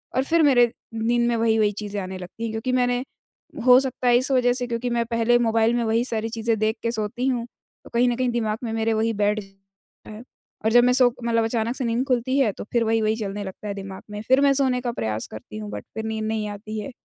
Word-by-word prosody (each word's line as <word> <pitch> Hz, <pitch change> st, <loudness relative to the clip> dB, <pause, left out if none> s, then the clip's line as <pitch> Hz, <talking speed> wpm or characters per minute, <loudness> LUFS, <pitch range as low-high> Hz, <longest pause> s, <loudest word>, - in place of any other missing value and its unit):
और 260 Hz, -, +2 dB
फिर 330 Hz, +3 st, +2 dB
मेरे 245 Hz, -5 st, +5 dB, 0.2 s
नींद 235 Hz, +2 st, +1 dB
में 235 Hz, -, +1 dB
वही-वही 220 Hz, -2 st, +2 dB
चीज़ें 205 Hz, 0 st, -5 dB
आने 185 Hz, 0 st, -6 dB
लगती 185 Hz, +5 st, -9 dB
हैं, 225 Hz, -, -2 dB
क्योंकि 220 Hz, +3 st, -2 dB
मैंने 245 Hz, 0 st, +1 dB, 0.6 s
हो 250 Hz, 0 st, +8 dB
सकता 260 Hz, -1 st, -2 dB
है 240 Hz, -, +6 dB
इस 260 Hz, +2 st, 0 dB
वजह 245 Hz, -1 st, +3 dB
से 245 Hz, 0 st, -2 dB
क्योंकि 235 Hz, +1 st, -2 dB
मैं 235 Hz, -1 st, 0 dB
पहले 230 Hz, +1 st, +2 dB
मोबाइल 225 Hz, 0 st, +2 dB
में 240 Hz, -, 0 dB
वही 225 Hz, +1 st, +1 dB
सारी 225 Hz, -2 st, -2 dB
चीज़ें 225 Hz, 0 st, -1 dB
देख 220 Hz, +1 st, +1 dB
के 230 Hz, -, 0 dB
सोती 230 Hz, +3 st, -2 dB
हूँ, 245 Hz, -3 st, 0 dB, 0.4 s
तो -, -, -14 dB
कहीं 240 Hz, +1 st, +3 dB
न 240 Hz, -, 0 dB
कहीं 255 Hz, 0 st, 0 dB
दिमाग 220 Hz, -3 st, -1 dB
में 230 Hz, -, -3 dB
मेरे 225 Hz, 0 st, 0 dB
वही 225 Hz, +1 st, +1 dB
बैठ 210 Hz, +1 st, +2 dB, 0.7 s
है 215 Hz, 0 st, -9 dB, 0.4 s
और 220 Hz, -, +3 dB
जब 240 Hz, +1 st, +6 dB
मैं 250 Hz, 0 st, +4 dB
सो 250 Hz, -2 st, +4 dB
मतलब 230 Hz, -1 st, +1 dB
अचानक 230 Hz, +1 st, -1 dB
से 260 Hz, -, -3 dB
नींद 235 Hz, +3 st, 0 dB
खुलती 255 Hz, +1 st, +1 dB
है 245 Hz, -6 st, +3 dB
तो -, -, -7 dB
फिर 235 Hz, -, +3 dB
वही-वही 220 Hz, -1 st, +1 dB
चलने 205 Hz, -1 st, -4 dB
लगता 190 Hz, +2 st, -8 dB
है 200 Hz, -, -2 dB
दिमाग 195 Hz, -1 st, -8 dB
में, 210 Hz, -, -5 dB
फिर 260 Hz, +2 st, +5 dB
मैं 280 Hz, -1 st, +5 dB
सोने 260 Hz, -2 st, +1 dB
का 240 Hz, -1 st, -2 dB
प्रयास 110 Hz, -, -2 dB
करती 110 Hz, -1 st, -9 dB
हूँ 105 Hz, -1 st, -6 dB
बट 105 Hz, -1 st, -7 dB
फिर 220 Hz, 0 st, -4 dB
नींद 220 Hz, 0 st, -3 dB
नहीं 220 Hz, -1 st, -2 dB
आती 215 Hz, +1 st, -6 dB
है, 260 Hz, -, -6 dB
230 Hz, 250 wpm, -23 LUFS, 215-245 Hz, 0.7 s, हो